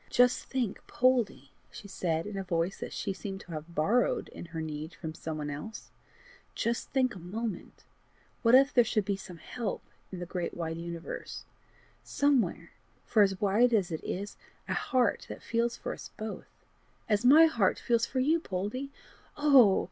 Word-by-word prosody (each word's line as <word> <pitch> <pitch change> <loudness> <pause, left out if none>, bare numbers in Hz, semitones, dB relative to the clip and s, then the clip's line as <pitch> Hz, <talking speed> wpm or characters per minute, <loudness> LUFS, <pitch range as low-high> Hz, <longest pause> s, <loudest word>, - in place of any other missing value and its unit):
"Just 245 0 +3
think, 245 -7 -2
Poldie," 240 - +1 0.2
she 200 - -10
said, 165 -4 -1
in 210 -1 -6
a 195 - -2
voice 175 0 -1
which - - -5
she 195 - -3
seemed 195 0 -6
to 175 - -13
have 160 +2 -7
borrowed 225 +11 +2
in - - -9
her 165 -1 -6
need 155 +1 -5
from 160 -3 -6
some 160 -1 -5
one 150 -1 -3
else, 150 +10 -8 0.3
" 485 0 -26
just 235 +1 -1
think 255 -3 +1
a 190 - -9
moment! 205 +3 -5 0.6
What 230 +1 +6
if 275 +1 +6
there 245 - +6
should 215 -3 0
be 200 0 0
some 185 -2 -10
help 215 +6 -4 0.3
in 185 - -6
the 175 - -5
great 175 0 -4
wide 165 -1 -3
universe 170 0 -6 0.6
somewhere, 285 -4 +1 0.3
for 220 - +3
as 195 -2 +3
wide 225 +4 +4
as 190 -4 +1
it 160 - -4
is 200 +2 -4 0.3
a - - -1
heart 250 -5 +1
that - - -8
feels 235 +1 0
for - - -4
us - - -9
both, 215 0 -6 0.6
as 210 -1 +2
my 300 +6 +8
heart 230 -12 +2
feels 235 -1 +1
for 260 - -2
you, 310 +6 +3
Poldie! 210 - -4 0.5
Oh! 270 -9 +6
205 Hz, 180 wpm, -30 LUFS, 175-245 Hz, 0.6 s, my